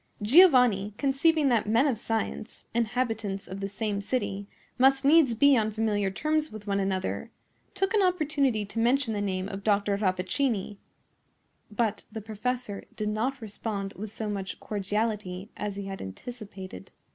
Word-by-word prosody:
Giovanni, 240 - +5
conceiving 285 +2 +3
that 225 -4 +1
men 230 +5 +4
of 275 -5 +2
science, 225 0 -4
inhabitants 225 -4 -1
of 190 +1 -6
the 195 0 -3
same 205 0 -2
city, 200 -3 -2 0.3
must 270 +1 +4
needs 285 -5 +5
be 280 +4 +6
on 220 -3 +2
familiar 210 -2 0
terms 305 +9 -1
with 215 -1 -9
one 200 -1 0
another, 190 - -2 0.5
took 390 +1 0
an 425 - +4
opportunity 290 - +1
to 200 +3 -5
mention 245 0 +2
the 205 - -2
name 190 -2 -2
of 195 -1 -6
Dr. 205 -1 +2
Rappaccini. 200 +3 -1 0.9
But 215 -1 -1
the 225 - -5
professor 220 0 -4
did 210 0 -2
not 245 +5 -1
respond 200 -2 -4
with 210 +1 -7
so 220 0 -4
much 195 -2 -4
cordiality 205 -2 -3
as 205 -1 -4
he 200 0 -5
had 195 0 -6
anticipated. 190 - -8
215 Hz, 155 wpm, -28 LUFS, 200-250 Hz, 0.9 s, be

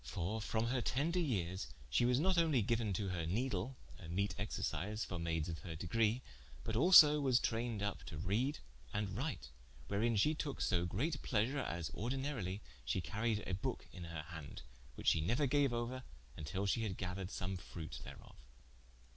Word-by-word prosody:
For 85 - -2
from 110 +2 0
her 125 0 +1
tender 160 +10 +1
yeares, 95 - -1 0.2
she 90 - +3
was 125 +1 +3
not 185 +4 +3
onely 160 -9 +4
giuen 115 0 +1
to 95 +1 -1
her 90 -2 -1
nedle 115 +4 -1 0.2
(a 85 - -9
meete 100 +4 0
exercise 105 0 -2
for 90 - -4
mayds 80 -2 -1
of 80 -2 -4
her 80 +1 -6
degre,) 110 +8 +1 0.4
but 110 - -2
also 150 +1 +9
was 130 -3 +4
trayned 115 -2 -1
vp 100 -1 -2
to 75 - -6
write 105 - 0 0.3
and 100 -2 -1
reade, 65 - -3 0.4
wherein 115 +3 +2
she 150 +10 +4
toke 150 -2 -3
so 85 -3 +2
greate 140 - -1
pleasure, 125 +5 +1
as 85 - -3
ordinarilie 115 - -2 0.2
shee - - 0
caried 105 +4 -1
a 95 - -2
booke 95 - -2
in 90 - -7
her 85 -2 -5
hande, 80 -6 -8 0.3
which - - +2
she 80 - +3
neuer 120 - +2
gaue 140 +1 +3
ouer, 120 +2 -2 0.4
till 95 +7 -2
she 115 +3 +1
had 105 -5 -2
gathered 90 0 -3
som 95 0 -3
fruit 80 -6 -7
thereof. - - -11
105 Hz, 180 wpm, -37 LUFS, 90-125 Hz, 0.4 s, also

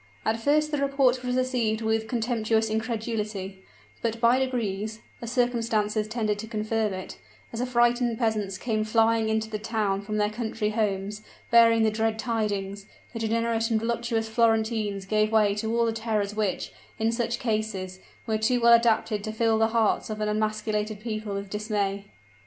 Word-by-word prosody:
At 220 +1 +1
first 300 +4 +2
the 295 - 0
report 275 -3 +2
was 250 0 -1
received 245 -4 0
with 220 0 0
contemptuous 225 -2 0
incredulity; 215 -4 -3 0.4
but 230 0 -2
by 235 +2 +4
degrees 220 -5 -2 0.2
as 235 -1 -5
circumstances 230 -4 0
tended 215 -2 -1
to 220 - -6
confirm 215 0 -1
it 185 0 -7 0.3
as 230 - -3
affrighted 240 -1 +2
peasants 215 -5 -1
came 215 -1 -1
flying 225 0 +2
into 220 0 0
the 215 -1 -4
town 210 -3 -1
from 215 +1 -4
their 210 0 +1
country 220 -1 -2
homes, 210 -1 -1 0.3
bearing 230 -1 +6
the 220 - +3
dread 220 0 0
tidings, 205 -4 -2 0.3
the 230 - -4
degenerate 225 +1 0
and 225 -1 +2
voluptuous 230 0 -1
Florentines 220 -3 +1
gave 215 +1 +1
way 210 -2 +4
to 220 +2 -2
all 235 - +3
the 225 - 0
terrors 215 -2 -1
which, 210 -3 -2 0.3
in 225 0 +1
such 235 0 -1
cases, 215 -5 -2 0.3
were 220 -1 0
too 245 +3 +2
well 235 0 +6
adapted 225 -2 +3
to 215 - -3
fill 220 0 +1
the 225 - +4
hearts 225 -1 +1
of 215 0 -4
an 215 - -1
emasculated 215 0 -1
people 215 -2 -4
with 200 0 -4
dismay. 205 -1 -2
220 Hz, 170 wpm, -26 LUFS, 210-230 Hz, 0.4 s, bearing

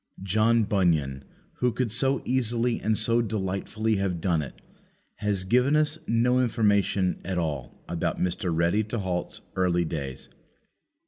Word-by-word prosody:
John 110 +4 +3
Bunyan, 80 -10 +1 0.3
who 125 0 +1
could 115 -1 -2
so 135 +3 0
easily 120 -1 +1
and 110 +1 +1
so 115 +2 +2
delightfully 110 +1 -1
have 95 -3 -1
done 85 -2 +1
it, 70 - -8 0.6
has 100 -3 0
given 125 +9 +3
us 155 +1 +2
no 125 +2 +3
information 105 -5 +1
at 95 0 -3
all 75 -6 -4
about 85 -1 -2
Mr. 90 +1 -1
Ready 85 +6 +2
to 110 +3 -4
halt's 90 -4 -3
early 90 -2 +2
days. 70 -5 -5
100 Hz, 140 wpm, -26 LUFS, 90-115 Hz, 0.6 s, John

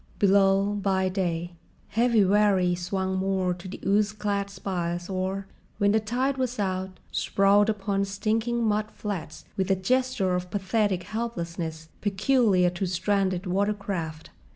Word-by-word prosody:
Below, 195 0 +4
by 190 -1 +1
day, 175 -2 -2 0.4
heavy 235 -1 +3
wherries 190 -3 +3
swung 190 0 -1
moored 190 -2 0
to 175 - -9
the 185 - -7
ooze 205 +1 +2
clad 200 -1 -2
spiles 175 -3 -3
or, 190 +1 -2 0.3
when 205 -1 +3
the 220 - +4
tide 250 +5 -1
was 255 -1 -1
out, 190 -2 -2
sprawled 200 +2 +3
upon 200 -2 0
stinking 220 +4 -1
mud 215 -1 +1
flats 175 -9 -6
with 190 0 0
a 195 - +4
gesture 250 -1 +1
of 180 0 -2
pathetic 200 -1 0
helplessness 170 -8 -4
peculiar 205 -3 +3
to 180 +2 -2
stranded 185 0 0
watercraft. 190 -4 -2
195 Hz, 135 wpm, -26 LUFS, 185-210 Hz, 0.4 s, Below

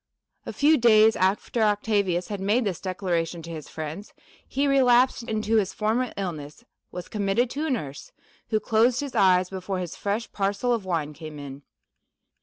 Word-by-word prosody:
A - - -3
few 305 +1 +3
days 220 -1 +6
after 195 +5 0
Octavius 205 -4 +1
had 205 -2 -4
made 210 +6 +2
this 190 -5 -3
declaration 175 -3 -2
to 165 - -8
his 155 -3 -8
friends, 160 +6 -7 0.3
he 275 +2 0
relapsed 255 -2 +4
into 220 -1 0
his 200 -3 0
former 225 +4 0
illness, 155 -7 -6 0.3
was 180 -1 -7
committed 210 +3 0
to 300 +4 -2
a - - -2
nurse, 150 - -4 0.4
who 215 - +1
closed 230 +4 +2
his 280 -2 -5
eyes 185 -1 +3
before 190 0 -4
his 180 -2 -5
fresh 210 +3 -3
parcel 205 +5 0
of 225 -5 -2
wine 160 -5 -2
came 155 -1 -9
in. 140 -1 -9
200 Hz, 170 wpm, -25 LUFS, 175-230 Hz, 0.4 s, days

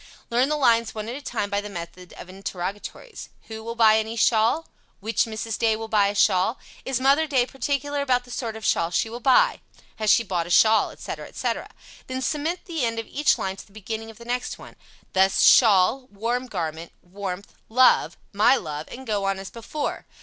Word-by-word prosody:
Learn 250 +4 +2
the 300 - +1
lines 230 -5 +2
one 215 0 -5
at 240 - -5
a 285 - -7
time 220 -6 -3
by 200 0 0
the 210 - -8
method 175 -1 -9
of - - -11
interrogatories. 195 - -7 0.2
"Who 220 0 -7
will 230 +1 -5
buy 220 -1 +5
any 220 +1 -4
shawl?" 230 +7 +2 0.3
"Which 220 +3 0
Mrs. 220 -1 -5
Day 225 -1 +3
will 225 +1 -6
buy 210 -2 +3
a 200 - -3
shawl?" 200 +3 +3 0.3
"Is 265 -2 -1
Mother 280 +4 +3
Day 260 -4 +2
particular 280 +2 -2
about 250 -3 +1
the 245 - -14
sort 235 -2 -4
of 220 0 -8
shawl 165 0 +2
she 220 +6 -1
will 240 - -6
buy?" 275 - +3 0.4
"Has 215 -1 -1
she 230 - +5
bought 175 -5 -2
a - - -9
shawl?" 220 +5 +5
etc., - - -7
etc. - - -3 0.4
Then 260 0 -4
cement 315 +6 -2
the 325 -6 -3
end 230 -1 -1
of 225 - -3
each 295 +6 +1
line 190 0 -3
to - - -10
the 200 - -24
beginning 220 +1 -6
of 220 - -13
the 235 - -12
next 245 +1 -3
one, - - -13 0.4
thus, 190 0 +3
"Shawl" 225 +3 +5
"warm 235 +5 -2
garment" 165 -5 -5
"warmth" 195 +1 -7 0.2
"love" 255 +3 +4 0.2
"my 215 +6 +5
love," 150 - -5
and 265 +2 -9
go 205 -4 -1
on 195 0 0
as 195 0 -8
before. 240 +6 -5
225 Hz, 210 wpm, -24 LUFS, 200-255 Hz, 0.4 s, buy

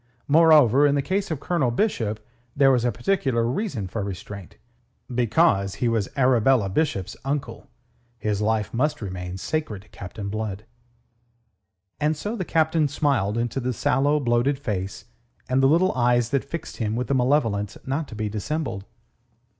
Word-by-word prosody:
Moreover, 145 -4 +6
in 140 - +2
the 140 - 0
case 195 +4 -1
of 160 -4 -3
Colonel 150 -5 0
Bishop 115 - -1 0.4
there 140 -1 +5
was 125 -3 +2
a 120 - +2
particular 130 - 0
reason 125 - -2
for 105 +4 -4
restraint. 100 0 -8 0.6
Because 120 - +2
he 125 - -1
was 115 -4 0
Arabella 125 -4 +3
Bishop's 100 - -1
uncle, 140 +1 -4 0.5
his 105 -2 -2
life 110 -1 0
must 145 +6 0
remain 90 -3 -5
sacred 110 -5 -3
to - - -24
Captain 100 +2 -8
Blood. 105 0 -4 1.3
And 155 0 +1
so 210 +8 -4
the 195 - -3
Captain 160 -2 +2
smiled 130 -7 0
into 120 +2 -1
the 125 0 -2
sallow, 140 +6 +2
bloated 125 +2 +1
face 100 -7 -4 0.4
and 130 +1 +2
the 135 - +5
little 175 +5 +4
eyes 120 -1 +2
that 140 - +1
fixed 160 +3 -6
him 110 -3 -1
with 125 +3 -2
a - - +3
malevolence 125 -6 +1
not 140 +3 -2
to - - -10
be 110 0 -2
dissembled. 110 0 -3
125 Hz, 160 wpm, -24 LUFS, 105-145 Hz, 1.3 s, Moreover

